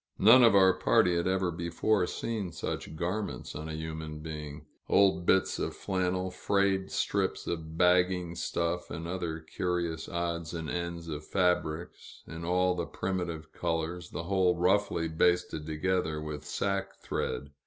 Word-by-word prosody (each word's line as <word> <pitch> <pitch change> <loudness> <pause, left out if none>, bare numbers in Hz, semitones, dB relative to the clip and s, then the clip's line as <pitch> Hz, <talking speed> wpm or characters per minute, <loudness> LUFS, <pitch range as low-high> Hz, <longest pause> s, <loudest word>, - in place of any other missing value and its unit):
None 115 +6 +8
of 115 -4 +6
our 95 -1 +7
party 90 -1 +3
had 85 +1 0
ever 95 -1 +1
before 90 +4 0
seen 105 -6 -3
such 80 -1 -5
garments 90 +6 -3
on 80 +1 -6
a 80 - -4
human 80 -1 -5
being 75 -1 -7 0.2
old 95 -3 +4
bits 95 0 +3
of - - -2
flannel, 95 -1 -1
frayed 95 0 +1
strips - - -1
of 80 -1 -4
bagging 90 -1 +3
stuff, 85 0 -2
and 85 0 -5
other 85 -3 -3
curious 85 0 -2
odds 85 -1 -3
and 80 -2 -4
ends 85 -1 -4
of 75 -2 -5
fabrics, 90 -2 -1
in 85 0 -8
all 90 +1 +2
the 85 -1 -3
primitive 85 -4 -3
colors, 85 +1 -2
the - - -5
whole 90 -1 +2
roughly 90 -2 +2
basted 80 -1 +1
together 80 0 0
with 75 -1 -6
sack 100 +4 -2
thread. 70 0 -3
85 Hz, 150 wpm, -30 LUFS, 80-95 Hz, 0.2 s, None